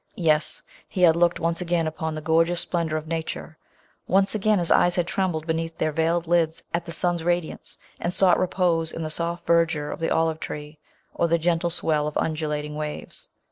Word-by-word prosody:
Yes! 155 -3 +2 0.3
he 180 - -1
had 165 -2 +7
looked 175 0 +2
once 165 +1 0
again 170 -2 0
upon 160 0 -3
the 155 - -5
gor 160 +1 +4
geous 175 +1 -2
splendour 165 -3 -1
of 155 - -5
nature! 160 -1 -5 0.5
Once 195 +2 +3
again 215 0 +2
his 175 -2 +2
eyes 175 0 +4
had 175 - +1
trembled 175 -4 -1
beneath 165 0 -2
their 155 - 0
veiled 165 +2 +1
lids, 165 -1 +1
at 170 - -1
the 170 - -6
sun's 175 0 -1
radiance, 175 -1 -2 0.2
and 175 - -1
sought 185 -1 +4
repose 175 -3 +1
in 165 - -5
the 155 - -3
soft 170 +1 -2
verdure 165 -3 +2
of - - -9
the 165 - 0
olive 160 -1 +1
tree, 150 0 -7 0.3
or 170 - +1
the 170 0 +3
gentle 170 +1 +1
swell 155 -3 0
of 150 - -3
undulating 150 -1 -2
waves. 150 0 -6
165 Hz, 200 wpm, -24 LUFS, 155-175 Hz, 0.5 s, had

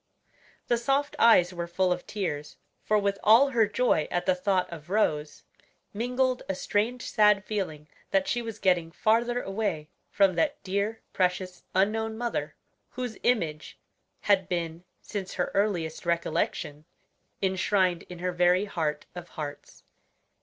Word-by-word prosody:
The 240 - +2
soft 275 +4 0
eyes 185 -6 +6
were 170 -1 -4
full 180 +1 +1
of 180 - -8
tears; 150 -8 -4 0.2
for 215 - +2
with 200 -1 0
all 235 +6 +7
her 230 -5 +3
joy 210 -8 +1
at 175 0 -1
the 185 - +4
thought 185 0 0
of 160 0 -10
Rose, 155 -8 0 0.5
mingled 250 +3 0
a 190 - 0
strange 225 +7 -1
sad 210 -2 +3
feeling 175 -8 -4 0.2
that 195 -1 +1
she 240 - 0
was 225 -2 -6
getting 175 -3 +1
farther 235 +6 +1
away 195 -7 -2 0.2
from 195 -2 +3
that 295 - 0
dear, 200 +3 -2
precious, 180 -1 -1
unknown 220 +3 +1
mother, 240 0 -3 0.3
whose 250 -3 -5
image 165 -11 -1 0.4
had 195 -3 +2
been, 170 -1 -3 0.2
since 195 -3 -5
her 180 - -1
earliest 180 -6 0
recollection, 170 -3 -1 0.6
enshrined 190 -1 +2
in 180 - -8
her 180 +1 -2
very 180 +2 +3
heart 155 -6 -2
of 175 -1 -9
hearts. 145 -3 -8
190 Hz, 145 wpm, -27 LUFS, 175-220 Hz, 0.6 s, all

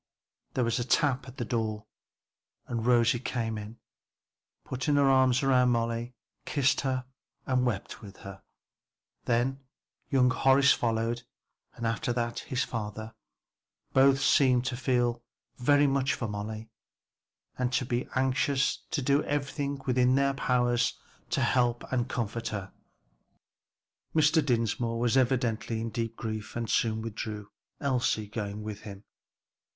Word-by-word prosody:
There 125 - +2
was 115 +1 0
a - - 0
tap 135 +1 +1
at 130 +1 -11
the 120 - -2
door 110 -2 -2 0.8
and 115 -1 -3
Rosie 120 -1 +4
came 115 -3 -2
in, 105 +2 -7 0.9
put 130 0 -4
her 145 -2 +3
arms 130 -1 +4
round 125 -2 +4
Molly, 115 +1 -1 0.3
kissed 140 -1 +1
her 130 -2 -1 0.4
and 130 -1 +1
wept 105 -6 -4
with 100 -2 -11
her. 95 -1 -9 0.8
Then 125 +3 +1 0.5
young 125 -2 +4
Horace 135 +2 +5
followed 115 0 -1 0.5
and 115 - -5
after 115 +4 -1
that 120 -1 -2
his 130 0 -2
father. 110 0 -5 0.8
Both 135 0 +5
seemed 125 -4 +4
to 125 0 -1
feel 120 -2 0 0.4
very 145 +3 +4
much 135 -1 +1
for 120 - -3
Molly 110 +2 -6 0.8
and 125 -1 -1
to 130 - +1
be 120 +1 -2
anxious 135 +1 +1
to 155 -6 -1
do 140 +3 +3
everything 140 0 -2
in 125 0 +3
their 140 0 +2
power 120 -2 +1 0.5
to - - 0
help 120 -2 +2
and 125 0 0
comfort 115 -1 -3
her. 100 -3 -5 1.4
Mr. 155 0 +4
Dinsmore 115 -2 0
was 120 +1 +2
evidently 120 -3 +1
in 115 0 -3
deep 115 0 -3
grief 110 -2 -5
and 120 -1 -2
soon 110 -1 +1
withdrew, 105 -2 -6 0.3
Elsie 130 -5 0
going 105 0 -5
with 105 -1 -6
him. 100 -1 -10
120 Hz, 135 wpm, -29 LUFS, 115-130 Hz, 1.4 s, Horace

